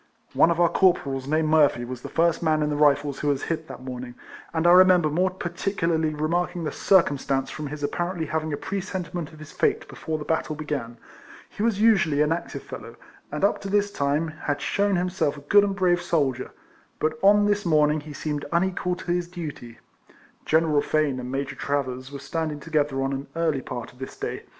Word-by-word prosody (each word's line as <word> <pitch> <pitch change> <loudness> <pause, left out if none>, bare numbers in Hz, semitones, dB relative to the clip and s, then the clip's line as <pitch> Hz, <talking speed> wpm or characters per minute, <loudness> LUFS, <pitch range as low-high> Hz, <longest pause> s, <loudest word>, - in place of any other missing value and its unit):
One - - +5
of 170 0 0
our 175 - +6
corporals, 140 -9 +1
named 155 +1 +1
Murphy, 145 -6 +4
was 125 0 -7
the 140 - -7
first 165 +2 +2
man 155 -2 +2
in 150 - 0
the - - 0
Rifles 145 -1 +2
who 150 - -2
was 140 -1 +1
hit 160 -1 -3
that 130 - -9
morning, 125 -1 -7 0.4
and 160 0 -1
I 175 - +7
remember 180 -3 +6
more 180 +5 +2
particularly 170 -3 -1
remarking 175 +3 -1
the 155 - -2
circumstance 140 -8 +2
from 155 -1 -5
his 145 +1 -7
ap 145 - -1
parently 175 -2 -2
having 155 0 -2
a 145 - -2
presentiment 180 -4 -4
of 155 - -14
his 155 0 -11
fate - - 0
before 160 -1 -4
the 150 - -7
battle 160 -1 -1
began. 145 -6 -4 0.5
He - - -8
was 220 -2 +1
usually 190 -10 +4
an 150 - 0
active 170 +1 -3
fellow, - - -9 0.4
and 150 +4 -4
up 200 - +2
to 195 - -5
this 205 0 +1
time 145 +2 0
had 150 -2 -3
shewn 200 +4 +1
himself 180 -4 0
a - - -10
good 200 +8 +5
and 200 -1 -1
brave 180 -2 +2
soldier, 140 -7 0 0.5
but 155 0 -1
on 205 +1 +6
this 205 0 +1
morning 155 -2 +3
he 150 0 -10
seemed 145 0 -3
unequal 180 +1 0
to 180 -1 -5
his 175 0 0
duty. 150 -10 -8 0.7
General 155 -2 +3
Fane 150 -4 0
and 125 0 -6
Major 135 +1 -3
Travers 130 -2 -3
were 140 - -6
standing 150 +2 -3
together 145 -3 0
on 135 +1 -1
an 135 +1 -5
early 160 -5 0
part 120 -2 -7
of 125 - -21
this 130 - -7
day. - - -5
155 Hz, 205 wpm, -25 LUFS, 145-175 Hz, 0.7 s, I